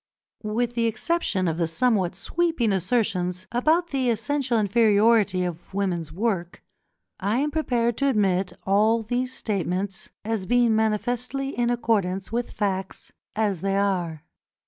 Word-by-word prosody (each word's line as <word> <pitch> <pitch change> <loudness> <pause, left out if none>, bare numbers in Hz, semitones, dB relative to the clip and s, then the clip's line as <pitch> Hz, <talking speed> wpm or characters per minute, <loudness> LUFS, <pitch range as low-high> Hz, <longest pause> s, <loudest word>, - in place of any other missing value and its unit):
With 230 +3 -1
the 230 -1 +1
exception 220 - 0
of 160 -1 -1
the 170 -1 +1
somewhat 190 0 +1
sweeping 325 -10 0
assertions 185 -2 0
about 315 +8 +2
the 260 -3 0
essential 240 +2 0
inferiority 210 -2 +3
of 175 +2 -7
women's 175 -5 -1
work, 185 -2 -2 0.6
I 205 +5 0
am 295 +3 0
prepared 240 -7 0
to 280 - +1
admit 195 -6 +1
all 215 +4 +3
these 245 +3 -2
statements 195 -2 -3 0.2
as 220 -4 -2
being 240 -1 +3
manifestly 245 +5 -1
in 240 -3 0
accordance 200 -6 0
with 240 +1 -2
facts 190 -2 -3 0.2
as 205 -5 0
they 195 0 0
are. 180 -6 -1
215 Hz, 135 wpm, -25 LUFS, 190-240 Hz, 0.6 s, inferiority